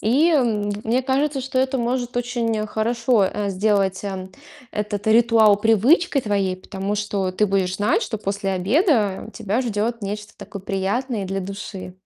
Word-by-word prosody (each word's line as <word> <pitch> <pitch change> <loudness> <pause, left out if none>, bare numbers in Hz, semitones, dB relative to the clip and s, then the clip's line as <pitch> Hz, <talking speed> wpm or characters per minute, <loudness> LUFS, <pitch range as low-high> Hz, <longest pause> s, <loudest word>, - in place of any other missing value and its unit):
И, 275 +10 +3
м, 225 -9 +1
мне 240 +4 +1
кажется, 275 +1 0
что 260 0 -2
это 265 +1 +1
может 245 0 -2
очень 235 -3 -1
хорошо, 230 0 +1
э, 200 +1 -2
сделать, 195 -1 +1
э, 190 -2 -5 0.4
этот 210 -1 -3
ритуал 225 -2 +5
привычкой 255 - +3
твоей. 200 -4 0
Потому 195 +2 -4
что 200 -3 -2
ты 200 +3 +2
будешь 190 -2 0
знать, 205 +1 +2
что - - -3
после 200 -1 -2
обеда 210 - +1
тебя 220 +1 -1
ждет 230 -1 -2
нечто 205 +1 -5
такое 200 -3 -9
приятное 200 +4 -2
и - - -5
для 195 +1 -2
души. 195 -1 -7
210 Hz, 160 wpm, -22 LUFS, 195-240 Hz, 0.4 s, ритуал